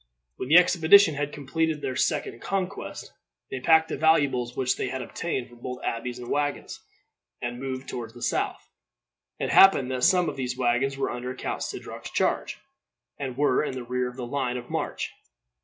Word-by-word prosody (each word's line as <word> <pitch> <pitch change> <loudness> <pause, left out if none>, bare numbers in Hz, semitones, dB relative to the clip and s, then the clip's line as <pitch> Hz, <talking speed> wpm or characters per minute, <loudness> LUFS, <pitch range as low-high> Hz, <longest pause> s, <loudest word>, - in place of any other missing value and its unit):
When 130 - -5
the 160 - +8
expedition 180 0 +6
had 145 0 -2
completed 155 +2 -1
their 130 - -3
second 120 - -1
conquest, 195 0 -4 0.4
they 135 - -3
packed 160 +4 +4
the - - -3
valuables 140 -6 +2
which 130 -1 +1
they - - -2
had 130 0 -4
obtained 135 -7 -3
from 120 -1 -17
both 125 +1 -5
abbeys 120 +1 -3
in 120 -1 -8
wagons, 145 +1 -2 0.6
and 120 0 -4
moved 130 0 -5
toward 115 -1 -6
the 120 - -8
south. - - -1 0.7
It - - -2
happened 140 -10 +6
that 125 -1 -2
some 180 +1 +4
of - - -4
these 125 -1 -3
wagons 130 +2 +1
were 135 - -1
under 125 +1 -5
Count - - -4
Sidroc's - - -6
charge, - - 0 0.6
and 130 -3 -4
were 145 -2 +3
in 150 - -3
the 130 - -5
rear 125 +1 -1
of 125 - -12
the 125 - -4
line 125 -1 -2
of 120 0 -9
march. - - -3
130 Hz, 185 wpm, -26 LUFS, 125-150 Hz, 0.7 s, the